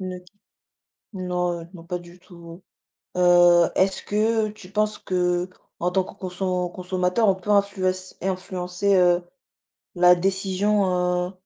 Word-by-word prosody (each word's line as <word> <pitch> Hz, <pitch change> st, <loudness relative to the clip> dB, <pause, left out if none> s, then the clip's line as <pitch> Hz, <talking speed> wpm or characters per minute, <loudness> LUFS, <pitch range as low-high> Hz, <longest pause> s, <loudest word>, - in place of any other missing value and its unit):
ne 185 Hz, -1 st, -5 dB, 1.0 s
non, 180 Hz, -2 st, -2 dB
heu, 165 Hz, -, -11 dB
non 165 Hz, -, -11 dB
pas 180 Hz, +1 st, -4 dB
du 175 Hz, +1 st, -15 dB
tout, 170 Hz, -1 st, -13 dB, 0.6 s
heu, 175 Hz, -1 st, +5 dB
est-ce 190 Hz, 0 st, +1 dB
que 220 Hz, +1 st, +1 dB
tu 205 Hz, -3 st, -12 dB
penses 210 Hz, +1 st, 0 dB
que 180 Hz, 0 st, -1 dB, 0.3 s
en 175 Hz, -, 0 dB
tant 190 Hz, 0 st, +1 dB
que -, -, -12 dB
conso 180 Hz, -1 st, -3 dB
consommateur 185 Hz, +4 st, 0 dB
on 195 Hz, -, +4 dB
peut 190 Hz, +2 st, -7 dB
influence- 185 Hz, -2 st, 0 dB
influencer, 185 Hz, +1 st, -1 dB
heu, 175 Hz, -1 st, +4 dB, 0.7 s
la 180 Hz, 0 st, +6 dB
décision, 185 Hz, -1 st, 0 dB
heu -, -, -11 dB
185 Hz, 135 wpm, -23 LUFS, 180-195 Hz, 1.0 s, la